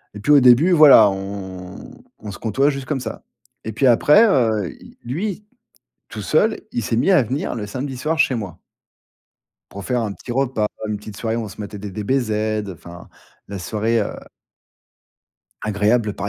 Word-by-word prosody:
et - - -7
puis, 145 - 0
au 145 - +8
début, 130 +9 +5
voilà, 145 - +8
on 95 -2 -8 0.2
on 105 - -8
se 90 - -9
côtoie 135 +6 +1
juste 135 -2 -4
comme 140 -2 -2
ça, 110 -3 -7 0.4
et 110 - -5
puis 125 +5 +1
après, 150 - +5
heu, 110 - +1
il - - -16
lui, 190 - -4 0.6
tout - - -7
seul, - - +1
il 120 - -2
s'est 115 - -2
mis 125 +12 +2
à 180 -8 +5
venir 130 +5 -3
le 105 -3 -5
samedi 130 +5 -5
soir 155 +5 -2
chez 130 - +3
moi 100 -8 -6 1.1
pour 100 0 -9
faire 125 -2 -1
un 105 -3 -3
petit 120 - -8
repas, 120 -5 0 0.2
une 105 - -2
petite 105 0 -10
soirée 115 0 -2
où 115 - -3
on - - -7
se 105 - -11
matait 105 0 -7
des 100 0 -7
DBZ, 110 +4 -1 0.4
heu, - - -5
enfin 85 +1 -13 0.4
la 100 - -6
soirée, 110 +4 -1
heu 100 - -3 1.5
agréable 105 +1 0
par 100 0 -4
115 Hz, 190 wpm, -20 LUFS, 105-135 Hz, 1.5 s, au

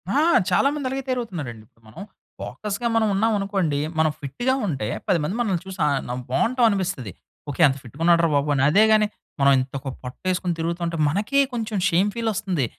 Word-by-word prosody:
ఆ! - - +4 0.3
చాలా 185 +9 +3
మంది 285 -3 -3
అలాగే 270 0 -3
తయారవుతున్నారండిప్పుడు 150 - -5
మనం. 140 - -11 0.4
ఫోకస్‌గా 215 +3 -4
మనవున్నావనుకోండి, 200 -7 +1 0.2
మనం 155 -1 +3
ఫిట్టుగా 200 - -1
ఉంటే, 130 -10 -2 0.2
10 175 - +3
మంది 180 +7 -2
మనల్ని 195 -8 0
చూసి 190 -1 -9
ఆహ్, 140 -2 +1
నం 125 - -3
బావుంటావనిపిస్తది. 195 - +1 0.4
ఓకే. 145 - -3
ఎంత 135 0 -1
ఫిట్టుగున్నాడు 165 +7 +2
రా 165 - +2
బాబు 145 +1 +1
అని. 135 - +1
అదే 205 +5 +6
గానీ, 215 -1 +4 0.3
మనవింతొక 135 0 +2 0.2
పొట్టేసుకొని 180 +7 -2
తిరుగుతా 170 +1 -2
ఉంటే 170 0 -3
మనకే 210 - +1
కొంచుం 220 -3 -3
షేమ్ 185 +5 +2
ఫీలొస్తంది. 205 - -1
180 Hz, 160 wpm, -23 LUFS, 140-215 Hz, 0.4 s, అదే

